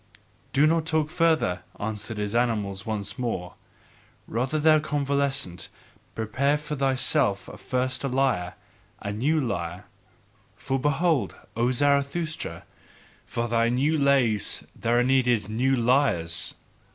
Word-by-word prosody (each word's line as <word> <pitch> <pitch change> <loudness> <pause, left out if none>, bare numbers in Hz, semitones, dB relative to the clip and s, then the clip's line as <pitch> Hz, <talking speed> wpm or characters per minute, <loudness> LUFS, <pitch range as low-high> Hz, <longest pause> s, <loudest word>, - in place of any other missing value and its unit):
"Do 140 +2 +4
not 160 0 +2
talk 155 -1 +1
further," 160 - +2 0.2
answered 105 +1 -3
his 105 0 -2
animals 105 -5 0
once 110 +2 -3
more; 100 -8 -3 0.7
"rather, 130 +6 -1
thou 155 0 +5
convalescent, 140 - -1 0.5
prepare 130 +7 +1
for 150 0 -5
thyself 135 -5 +1
first 130 +1 -1
a - - 0
lyre, 130 -9 0 0.4
a 100 - -4
new 140 +10 +1
lyre! 90 - -3 0.7
For 135 0 -2
behold, 150 +2 +1 0.2
O 120 +2 +2
Zarathustra! 140 +5 0 0.6
For 120 0 -2
thy 115 0 +2
new 135 +6 +2
lays 135 -7 +2
there 120 +1 +1
are - - +4
needed 125 -5 +2
new 130 +5 +2
lyres. 115 - +1
130 Hz, 120 wpm, -26 LUFS, 110-145 Hz, 0.7 s, thou